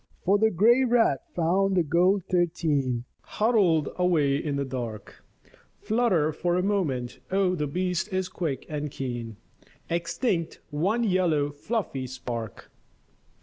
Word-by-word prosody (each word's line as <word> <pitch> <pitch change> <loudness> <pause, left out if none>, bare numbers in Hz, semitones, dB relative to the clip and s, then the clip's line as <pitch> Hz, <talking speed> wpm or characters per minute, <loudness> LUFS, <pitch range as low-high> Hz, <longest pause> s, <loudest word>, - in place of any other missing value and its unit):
For 200 +2 +3
the 220 +1 +4
grey 230 +7 +4
rat 230 - +3
found 190 +3 +2
the 175 - +4
gold 180 +5 +2
thirteen 155 -8 0 0.2
Huddled 195 - +2
away 165 -6 +2
in 145 0 -2
the 140 0 -1
dark, 120 -5 -6 0.6
Flutter 200 -10 +1
for 175 +3 0
a 180 - +1
moment, 155 -12 -1
oh 190 -1 +2
the 150 -4 -1
beast 180 +5 -2
is 185 -1 -1
quick 165 -7 -4
and 150 -1 -3
keen, 120 -5 -5 0.5
Extinct 170 +1 -1
one 195 +11 +1
yellow 175 -8 +1
fluffy 145 - -3
spark. 120 -4 -6
170 Hz, 130 wpm, -26 LUFS, 140-195 Hz, 0.6 s, the